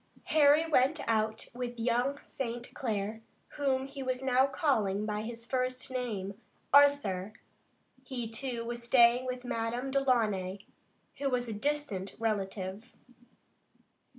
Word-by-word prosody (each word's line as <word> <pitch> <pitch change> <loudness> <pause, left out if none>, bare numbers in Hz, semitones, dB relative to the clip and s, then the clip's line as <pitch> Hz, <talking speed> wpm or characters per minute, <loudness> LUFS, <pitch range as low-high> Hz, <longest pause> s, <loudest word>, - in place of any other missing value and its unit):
Harry 300 +1 +6
went 300 -1 +3
out 220 0 0
with 245 0 -5
young 245 +4 +1
St. 240 -2 -5
Clair, 220 -2 -2 0.3
whom 270 -2 0
he 275 0 -8
was 255 0 -2
now 260 0 +4
calling 220 - +1
by 210 0 -2
his 230 +1 -6
first 255 +1 -1
name, 215 -5 -4 0.3
Arthur. 275 -9 +4 0.7
He, 245 -4 -4
too, 230 +1 -4
was 240 0 -4
staying 240 +1 +5
with 250 0 -4
Madame 240 +2 -2
Delaunay, 215 -8 +1 0.5
who 280 -1 0
was 250 -1 0
a 225 - -3
distant 215 -5 -2
relative. 200 0 -3
245 Hz, 125 wpm, -31 LUFS, 220-265 Hz, 0.7 s, Harry